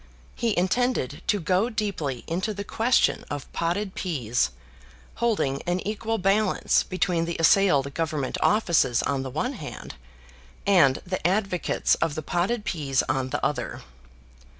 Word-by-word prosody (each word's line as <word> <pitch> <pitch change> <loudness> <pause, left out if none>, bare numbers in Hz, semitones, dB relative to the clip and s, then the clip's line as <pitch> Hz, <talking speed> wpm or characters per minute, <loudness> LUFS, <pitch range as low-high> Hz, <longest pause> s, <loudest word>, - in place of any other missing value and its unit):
He 230 -3 -1
intended 185 - 0
to 205 - +2
go 185 +6 +1
deeply 185 - -3
into 190 +6 -2
the 200 - -4
question 230 +4 +2
of 145 -2 -6
potted 185 +4 -1
peas, 125 - -1 0.7
holding 205 -13 0
an 175 +1 +1
equal 220 +1 -2
balance 195 +1 +2
between 180 -2 0
the 170 0 -3
assailed 155 -5 +4
Government 155 -4 -2
offices 170 - +3
on 140 -1 0
the 135 - -4
one 155 - -2
hand, 145 - -8 0.7
and 170 -10 +4
the 185 +1 -3
advocates 195 -2 +1
of 160 -3 0
the 155 - -4
potted 200 +8 -1
peas 140 -8 0
on 130 0 -1
the 145 - -2
other. 125 -4 -3
175 Hz, 140 wpm, -25 LUFS, 145-205 Hz, 0.7 s, assailed